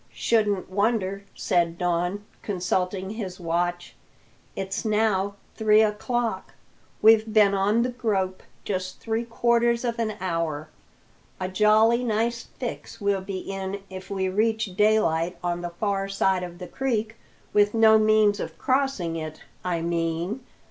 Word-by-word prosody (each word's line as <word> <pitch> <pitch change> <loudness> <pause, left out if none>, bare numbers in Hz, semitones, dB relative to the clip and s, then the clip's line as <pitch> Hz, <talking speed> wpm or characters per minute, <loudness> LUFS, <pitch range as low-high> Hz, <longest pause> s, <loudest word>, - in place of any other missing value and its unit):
"Shouldn't 210 -4 +1
wonder," 200 -1 0
said 170 -1 +1
Don, 180 +3 -1 0.2
consulting 185 0 -1
his 195 -5 -6
watch. 175 +1 -2 0.6
"It's 195 0 -3
now 210 -3 +1 0.2
three 215 0 +4
o'clock; 230 +2 -2 0.5
we've 220 0 +6
been 210 -2 +5
on 205 +4 +2
the 250 - 0
grope 200 -7 -1 0.2
just 185 -2 -3
three 225 0 -2
quarters 235 +1 +1
of 235 -1 -2
an 215 -2 -1
hour. 165 -4 -2 0.7
A 185 - -2
jolly 215 +5 +4
nice 230 +1 0
fix 240 -2 -7
we'll 200 -2 +1
be 190 0 -5
in 195 0 -5
if 190 +1 -8
we 190 -1 -1
reach 220 0 0
daylight 180 -5 +2
on 175 0 -1
the 175 - -3
far 195 +2 -2
side 190 -1 +1
of 175 -1 -7
the 180 0 -8
creek 230 -3 -2 0.4
with 205 +1 +3
no 220 -1 +6
means 215 -1 +4
of - - -5
crossing 260 -12 0
it, 155 -1 -7 0.2
I 170 -2 -1
mean. 170 +5 -1
200 Hz, 140 wpm, -25 LUFS, 185-220 Hz, 0.7 s, we've